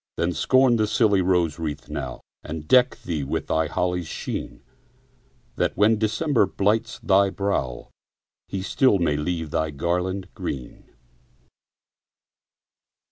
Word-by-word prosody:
Then, 85 Hz, +1 st, 0 dB
scorn 130 Hz, -, +3 dB
the 110 Hz, -1 st, +1 dB
silly 105 Hz, -3 st, +3 dB
rose 90 Hz, -4 st, +1 dB
wreath 75 Hz, -2 st, -4 dB
now, -, -, -5 dB, 0.2 s
And 75 Hz, 0 st, -7 dB
deck 125 Hz, 0 st, +4 dB
thee 80 Hz, -5 st, -2 dB
with 70 Hz, -, -3 dB
the 80 Hz, 0 st, 0 dB
holly's 90 Hz, -1 st, -1 dB
sheen, -, -, -5 dB, 0.9 s
That, -, -, 0 dB
when 105 Hz, +1 st, +4 dB
December 110 Hz, +2 st, +2 dB
blights 105 Hz, +3 st, 0 dB
thy 100 Hz, -2 st, +4 dB
brow, 95 Hz, -11 st, -3 dB, 0.6 s
He 95 Hz, -1 st, -4 dB
still 130 Hz, +1 st, +3 dB
may 85 Hz, -5 st, +1 dB
leave 80 Hz, 0 st, -3 dB
thy 80 Hz, 0 st, 0 dB
garland 90 Hz, +5 st, -2 dB
green. 65 Hz, -3 st, -7 dB
90 Hz, 125 wpm, -24 LUFS, 80-105 Hz, 0.9 s, deck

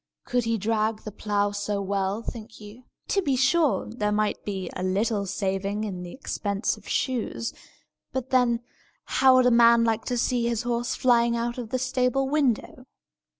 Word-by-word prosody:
Could 245 Hz, -1 st, 0 dB
he 230 Hz, 0 st, +1 dB
drag 215 Hz, +1 st, 0 dB
the 215 Hz, -, -7 dB
plough 205 Hz, 0 st, -1 dB
so 205 Hz, 0 st, -2 dB
well, 195 Hz, +2 st, -1 dB
think 225 Hz, -1 st, -8 dB
you? 215 Hz, +4 st, -12 dB, 0.2 s
To 395 Hz, -, +2 dB
be 280 Hz, -7 st, +1 dB
sure, 275 Hz, +4 st, +2 dB
there 210 Hz, -2 st, -2 dB
might 210 Hz, 0 st, 0 dB
be 190 Hz, -3 st, -4 dB
a -, -, -4 dB
little 200 Hz, +2 st, 0 dB
saving 195 Hz, +2 st, -2 dB
in 190 Hz, -4 st, -4 dB
the 175 Hz, -1 st, -7 dB
expense 205 Hz, -6 st, -2 dB
of -, -, -14 dB
shoes; 240 Hz, -3 st, -2 dB, 0.6 s
but 260 Hz, 0 st, -4 dB
then, 245 Hz, -2 st, +3 dB, 0.4 s
how 260 Hz, -1 st, +4 dB
would 255 Hz, -1 st, +5 dB
a 250 Hz, -, +5 dB
man 235 Hz, 0 st, +6 dB
like 225 Hz, -1 st, +1 dB
to 245 Hz, -, -1 dB
see 240 Hz, 0 st, +1 dB
his 235 Hz, -1 st, -1 dB
horse 240 Hz, 0 st, -1 dB
flying 235 Hz, -2 st, +3 dB
out 235 Hz, +1 st, -2 dB
of 235 Hz, -3 st, -6 dB
the 255 Hz, -, 0 dB
stable 255 Hz, +1 st, 0 dB
window? 265 Hz, -3 st, 0 dB
230 Hz, 180 wpm, -26 LUFS, 205-250 Hz, 0.6 s, man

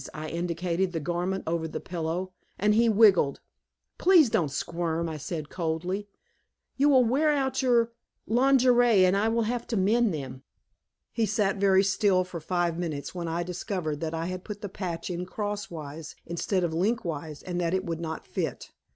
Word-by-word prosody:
I 155 Hz, 0 st, -5 dB
indicated 175 Hz, +2 st, -1 dB
the 165 Hz, -, -1 dB
garment 175 Hz, +4 st, -2 dB
over 160 Hz, 0 st, -1 dB
the 155 Hz, -, -5 dB
pillow, 175 Hz, +2 st, -3 dB, 0.3 s
and 210 Hz, +2 st, +3 dB
he 230 Hz, +2 st, +4 dB
wiggled. 200 Hz, -10 st, +5 dB, 0.6 s
"Please 340 Hz, -, +6 dB
don't 160 Hz, -7 st, +1 dB
squirm," 170 Hz, +3 st, -2 dB
I 160 Hz, -1 st, -4 dB
said 150 Hz, 0 st, -5 dB
coldly. 180 Hz, +4 st, -2 dB, 0.7 s
"You 285 Hz, +2 st, +3 dB
will 260 Hz, -3 st, +5 dB
wear 280 Hz, +7 st, +2 dB
out 270 Hz, -3 st, +1 dB
your 235 Hz, -3 st, +3 dB, 0.3 s
lingerie, 245 Hz, -3 st, +4 dB
and 185 Hz, +1 st, +4 dB
I 205 Hz, +2 st, +2 dB
will 230 Hz, 0 st, +1 dB
have 235 Hz, +2 st, -2 dB
to 230 Hz, -, -1 dB
mend 220 Hz, +4 st, +3 dB
them." 135 Hz, -4 st, -6 dB, 0.7 s
He 225 Hz, -2 st, 0 dB
sat 200 Hz, -1 st, +1 dB
very 195 Hz, -1 st, +4 dB
still 190 Hz, -1 st, +2 dB
for 180 Hz, -2 st, -7 dB
five 175 Hz, 0 st, -1 dB
minutes, 155 Hz, -5 st, -4 dB
when 175 Hz, -2 st, -4 dB
I 165 Hz, +1 st, -1 dB
discovered 180 Hz, -3 st, -3 dB
that 160 Hz, +1 st, -3 dB
I 165 Hz, 0 st, -2 dB
had 185 Hz, +1 st, -5 dB
put 210 Hz, -1 st, -7 dB
the 205 Hz, -, -5 dB
patch 180 Hz, -2 st, -4 dB
in 180 Hz, +1 st, -4 dB
crosswise 170 Hz, -8 st, -5 dB
instead 175 Hz, +2 st, -1 dB
of 170 Hz, -2 st, -1 dB
lengthwise 165 Hz, -6 st, -2 dB
and 180 Hz, -1 st, -3 dB
that 170 Hz, +1 st, +1 dB
it 190 Hz, +1 st, -2 dB
would 165 Hz, -1 st, -3 dB
not 160 Hz, -1 st, -5 dB
fit. -, -, -4 dB
185 Hz, 175 wpm, -27 LUFS, 165-215 Hz, 0.7 s, Please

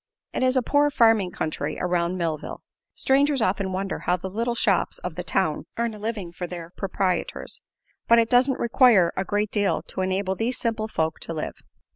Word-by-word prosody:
It -, -, -2 dB
is 255 Hz, 0 st, +3 dB
a 255 Hz, -, +2 dB
poor 290 Hz, +4 st, +3 dB
farming 225 Hz, -8 st, +4 dB
country 155 Hz, -3 st, -3 dB
around 175 Hz, 0 st, 0 dB
Millville. 160 Hz, -4 st, -3 dB, 0.3 s
Strangers 280 Hz, +1 st, +2 dB
often 195 Hz, -2 st, 0 dB
wonder 195 Hz, +1 st, -3 dB
how 180 Hz, -, 0 dB
the 185 Hz, +1 st, -6 dB
little 235 Hz, +4 st, -1 dB
shops 200 Hz, -5 st, +1 dB
of 180 Hz, -, -5 dB
the 180 Hz, -, -5 dB
town 175 Hz, -2 st, -1 dB
earn 235 Hz, -1 st, -1 dB
a 210 Hz, -, -10 dB
living 210 Hz, -5 st, -4 dB
for 175 Hz, +1 st, -5 dB
their 170 Hz, -1 st, -8 dB
proprietors; 190 Hz, -2 st, -2 dB, 0.5 s
but 235 Hz, -, +6 dB
it 230 Hz, -1 st, +4 dB
doesn't 255 Hz, +2 st, +3 dB
require 230 Hz, -7 st, +4 dB
a 190 Hz, -, -1 dB
great 205 Hz, +1 st, -1 dB
deal 205 Hz, -2 st, +1 dB
to -, -, -5 dB
enable 190 Hz, +1 st, 0 dB
these 230 Hz, +6 st, -1 dB
simple 225 Hz, -2 st, -1 dB
folk 160 Hz, -6 st, -1 dB
to 165 Hz, -, -5 dB
live. 155 Hz, -, -3 dB
195 Hz, 190 wpm, -24 LUFS, 180-230 Hz, 0.5 s, but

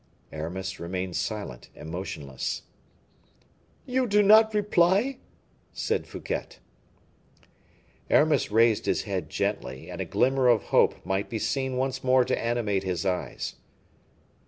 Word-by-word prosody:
Aramis 90 Hz, +5 st, -5 dB
remained 90 Hz, +1 st, -4 dB
silent 90 Hz, -, -4 dB
and 80 Hz, -, -9 dB
motionless. 75 Hz, -7 st, -4 dB, 1.2 s
"You 255 Hz, 0 st, 0 dB
do 210 Hz, -1 st, +4 dB
not 220 Hz, +2 st, +7 dB
reply?" 205 Hz, +5 st, +2 dB, 0.5 s
said -, -, -1 dB
Fouquet. -, -, -5 dB, 1.5 s
Aramis 150 Hz, -3 st, +3 dB
raised 110 Hz, 0 st, +3 dB
his -, -, +1 dB
head 95 Hz, -7 st, -3 dB
gently, 65 Hz, +1 st, -3 dB
and -, -, -5 dB
a -, -, -2 dB
glimmer 130 Hz, 0 st, +2 dB
of 120 Hz, -4 st, +4 dB
hope -, -, +3 dB
might 95 Hz, +2 st, -1 dB
be 115 Hz, -, -3 dB
seen 130 Hz, +3 st, -1 dB
once 130 Hz, 0 st, -2 dB
more 130 Hz, -1 st, +4 dB
to -, -, 0 dB
animate 115 Hz, -5 st, 0 dB
his 90 Hz, -2 st, -3 dB
eyes. 90 Hz, -2 st, -3 dB
110 Hz, 125 wpm, -27 LUFS, 90-135 Hz, 1.5 s, not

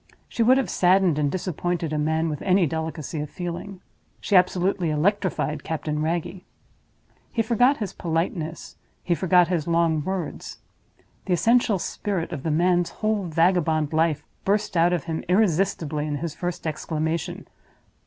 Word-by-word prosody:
She -, -, -3 dB
would 250 Hz, +3 st, +5 dB
have 270 Hz, -, 0 dB
saddened 180 Hz, -3 st, +3 dB
and 145 Hz, -1 st, +1 dB
disappointed 175 Hz, -2 st, -2 dB
a 150 Hz, -, 0 dB
man 160 Hz, +2 st, +1 dB
with 150 Hz, -3 st, -4 dB
any 185 Hz, -1 st, +3 dB
delicacy 160 Hz, 0 st, -4 dB
of 150 Hz, 0 st, -4 dB
feeling. 180 Hz, +2 st, -6 dB, 0.4 s
She 205 Hz, -, 0 dB
absolutely 180 Hz, -1 st, +2 dB
electrified 155 Hz, -2 st, 0 dB
Captain 150 Hz, -1 st, -3 dB
Wragge. 170 Hz, +3 st, -2 dB, 0.9 s
He 225 Hz, -, 0 dB
forgot 245 Hz, +5 st, +3 dB
his 210 Hz, -3 st, -4 dB
politeness, 165 Hz, -1 st, -3 dB, 0.3 s
he 175 Hz, -, +1 dB
forgot 180 Hz, 0 st, +3 dB
his 170 Hz, -4 st, -1 dB
long 165 Hz, -2 st, +2 dB
words. 190 Hz, -1 st, -4 dB, 0.7 s
The 185 Hz, -, 0 dB
essential 230 Hz, +3 st, +3 dB
spirit 185 Hz, -1 st, -3 dB
of 155 Hz, -6 st, -4 dB
the 160 Hz, -, -2 dB
man's 175 Hz, +2 st, +2 dB, 0.2 s
whole 215 Hz, -3 st, +1 dB
vagabond 165 Hz, -2 st, +1 dB
life 155 Hz, -2 st, +1 dB, 0.2 s
burst 205 Hz, 0 st, 0 dB
out 170 Hz, +1 st, +4 dB
of 175 Hz, -5 st, 0 dB
him 160 Hz, -1 st, -4 dB
irresistibly 170 Hz, -6 st, +1 dB
in 150 Hz, -, -2 dB
his 155 Hz, +1 st, -4 dB
first 175 Hz, 0 st, -5 dB
exclamation. 160 Hz, +1 st, -3 dB
170 Hz, 150 wpm, -24 LUFS, 155-185 Hz, 0.9 s, would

